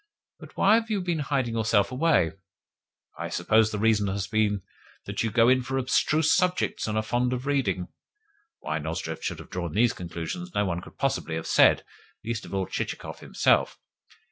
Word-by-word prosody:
But -, -, -14 dB
why 200 Hz, -, +5 dB
have 225 Hz, 0 st, -9 dB
you 210 Hz, -2 st, 0 dB
been 175 Hz, -3 st, -1 dB
hiding 135 Hz, -5 st, -1 dB
yourself 110 Hz, -1 st, +2 dB
away? 130 Hz, -, +2 dB, 0.9 s
I -, -, -3 dB
suppose 110 Hz, +5 st, +3 dB
the 105 Hz, -, -4 dB
reason 105 Hz, -1 st, +2 dB
has 100 Hz, 0 st, -2 dB
been 105 Hz, 0 st, 0 dB, 0.4 s
that -, -, -3 dB
you 115 Hz, -, 0 dB
go 115 Hz, +2 st, +4 dB
in 130 Hz, +1 st, +4 dB
for 135 Hz, +2 st, -3 dB
abstruse 150 Hz, +4 st, +2 dB
subjects 180 Hz, -8 st, 0 dB
and 110 Hz, 0 st, -1 dB
are 110 Hz, -, +1 dB
fond 120 Hz, +3 st, 0 dB
of 125 Hz, +1 st, -4 dB
reading" 135 Hz, -11 st, 0 dB, 0.7 s
(why 80 Hz, -, -2 dB
Nozdrev 80 Hz, +1 st, -4 dB
should -, -, -3 dB
have -, -, -12 dB
drawn 85 Hz, -3 st, -4 dB
these 115 Hz, +3 st, +3 dB
conclusions 90 Hz, -, -6 dB
no 105 Hz, -, +2 dB
one 85 Hz, -2 st, -2 dB
could -, -, -14 dB
possibly 80 Hz, -, -1 dB
have 80 Hz, -, -4 dB
said -, -, +5 dB, 0.4 s
least 115 Hz, -1 st, -3 dB
of -, -, -10 dB
all 95 Hz, -1 st, 0 dB
Chichikov -, -, -5 dB
himself). -, -, +1 dB
110 Hz, 185 wpm, -26 LUFS, 95-135 Hz, 0.9 s, why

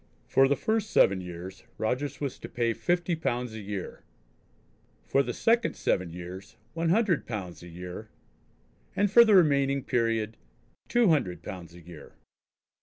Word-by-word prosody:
For 135 Hz, 0 st, +4 dB
the 140 Hz, -, +2 dB
first 220 Hz, +3 st, -1 dB
seven 95 Hz, -, +4 dB
years 90 Hz, +2 st, -8 dB
Rogers 130 Hz, +6 st, -2 dB
was 140 Hz, -3 st, -4 dB
to -, -, -8 dB
pay 115 Hz, -1 st, 0 dB
fifty 175 Hz, +5 st, 0 dB
pounds 125 Hz, -6 st, -2 dB
a 110 Hz, -, -6 dB
year; 100 Hz, -2 st, -6 dB, 1.0 s
for 135 Hz, -, +2 dB
the -, -, -2 dB
second 230 Hz, +1 st, +1 dB
seven 90 Hz, -3 st, -1 dB
years 90 Hz, +3 st, -9 dB, 0.2 s
one 165 Hz, +1 st, -1 dB
hundred 195 Hz, -3 st, +2 dB
pounds 95 Hz, -7 st, -6 dB
a 85 Hz, -, -11 dB
year; 90 Hz, +1 st, -8 dB, 0.9 s
and 205 Hz, 0 st, +2 dB
for 235 Hz, +2 st, +9 dB
the 220 Hz, -3 st, +5 dB
remaining 140 Hz, -5 st, +3 dB
period 115 Hz, -2 st, 0 dB, 0.5 s
two 240 Hz, -4 st, +3 dB
hundred 90 Hz, -, 0 dB
pounds 85 Hz, -2 st, -8 dB
a 85 Hz, -, -13 dB
year. 85 Hz, -3 st, -13 dB
120 Hz, 155 wpm, -28 LUFS, -, 1.0 s, for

